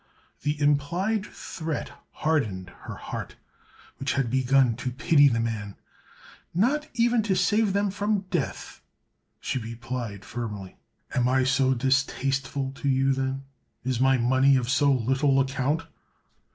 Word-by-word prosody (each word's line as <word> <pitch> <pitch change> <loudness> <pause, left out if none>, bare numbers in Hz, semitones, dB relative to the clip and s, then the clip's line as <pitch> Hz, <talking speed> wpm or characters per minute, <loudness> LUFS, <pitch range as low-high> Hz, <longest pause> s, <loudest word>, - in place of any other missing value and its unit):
The 145 +1 -1
implied 170 +9 +1
threat 160 -2 -5 0.2
hardened 105 - -1
her - - -6
heart, - - -6 0.6
which 135 - -1
had 135 -4 0
begun 130 -2 +3
to 130 - -3
pity 145 +3 +4
the 115 -4 +1
man. 110 -3 -3 0.8
"Not 280 - +2
even 235 0 +3
to 205 -3 0
save 200 +3 +2
them 200 0 +1
from 205 +1 0
death!" 165 -8 -3 0.6
she 130 - -2
replied 115 -2 -6
firmly. 105 -5 -6 0.4
"Am 125 0 +2
I 130 0 +3
so 130 0 +2
distasteful 135 +1 0
to 140 - -1
you, 135 0 +3
then? 135 0 -2 0.4
Is 130 -1 -1
my 135 0 +4
money 130 +3 +4
of 125 -1 0
so 145 0 +4
little 135 +2 +2
account?" 135 +4 0
135 Hz, 135 wpm, -26 LUFS, 125-155 Hz, 0.8 s, pity